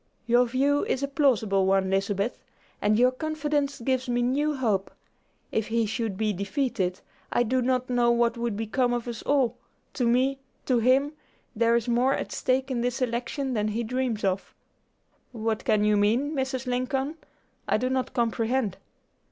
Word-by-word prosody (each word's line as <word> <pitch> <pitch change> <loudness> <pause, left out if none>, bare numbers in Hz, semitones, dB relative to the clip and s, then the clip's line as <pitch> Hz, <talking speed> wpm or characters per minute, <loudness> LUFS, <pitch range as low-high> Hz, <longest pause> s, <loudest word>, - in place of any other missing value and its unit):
"Your 240 +1 +4
view 275 +4 +2
is 265 - -1
a - - +1
plausible 225 -9 +2
one, 190 0 +2
Lizabeth, 200 +3 0 0.4
and 210 +1 +3
your 250 +2 +5
confidence 295 0 -2
gives 260 +1 -1
me 240 0 +1
new 290 +5 +1
hope. 215 -7 0 0.6
If 220 -1 -1
he 230 0 +1
should 220 -2 -3
be 215 0 0
defeated, 200 -2 -2 0.3
I 240 - +3
do 255 +2 +1
not 255 0 0
know 245 -1 +2
what 235 0 +2
would 235 -3 -2
become 245 +3 0
of 240 0 -3
us 235 -2 -5
all. 260 -4 +1 0.4
To 245 -3 0
me, 260 +3 +2 0.3
to 250 -3 +2
him, 265 +5 +3 0.4
there 230 +1 +3
is 235 0 0
more 245 +3 +2
at - - -4
stake 265 +1 0
in 240 -2 -1
this 245 +1 -1
election 255 +2 -2
than 210 -2 0
he 220 +3 -2
dreams 245 -2 -2
of." 195 0 -1 0.8
"What 220 -1 -2
can 210 -1 +3
you 210 0 +3
mean, 230 +8 +2
Mrs. 265 -3 -2
Lincoln? 265 +4 -1 0.5
I - - +3
do 250 +4 -1
not 260 0 -1
comprehend." 230 -2 0
245 Hz, 170 wpm, -26 LUFS, 220-260 Hz, 0.8 s, your